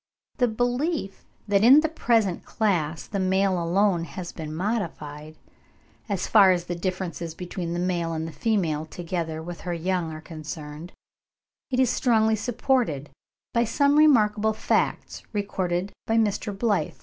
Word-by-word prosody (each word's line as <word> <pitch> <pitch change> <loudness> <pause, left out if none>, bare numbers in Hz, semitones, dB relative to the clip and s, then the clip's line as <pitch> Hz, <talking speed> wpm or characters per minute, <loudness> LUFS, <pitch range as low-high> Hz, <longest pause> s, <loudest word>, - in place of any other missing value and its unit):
The 245 - +3
belief 245 - -2 0.2
that 200 0 +3
in 270 +6 +8
the 320 - +1
present 225 - +1
class 165 -8 -1
the 200 - -4
male 190 -1 +2
alone 175 0 +2
has 175 +3 -7
been 155 -2 -7
modified, 155 -5 -4 0.7
as 195 -3 -1
far 200 -4 +6
as 175 -1 +1
the 175 - -3
differences 175 -2 -4
between 175 -1 -5
the - - -2
male 175 -2 -1
and 160 0 -3
the - - -6
female 160 -8 0
together 165 -2 -4
with 175 0 -7
her 175 -1 -3
young 175 -1 -1
are 155 - -7
concerned, 155 0 -8 0.8
is 255 -2 +2
strongly 220 -3 +3
supported 230 - 0 0.4
by 235 - +3
some 280 +5 +2
remarkable 220 -8 +4
facts - - -1
recorded 190 -2 -2 0.2
by 225 - +2
Mr. 210 -1 +1
Blyth 200 -5 0
(5. - - -27
190 Hz, 150 wpm, -25 LUFS, 165-220 Hz, 0.8 s, in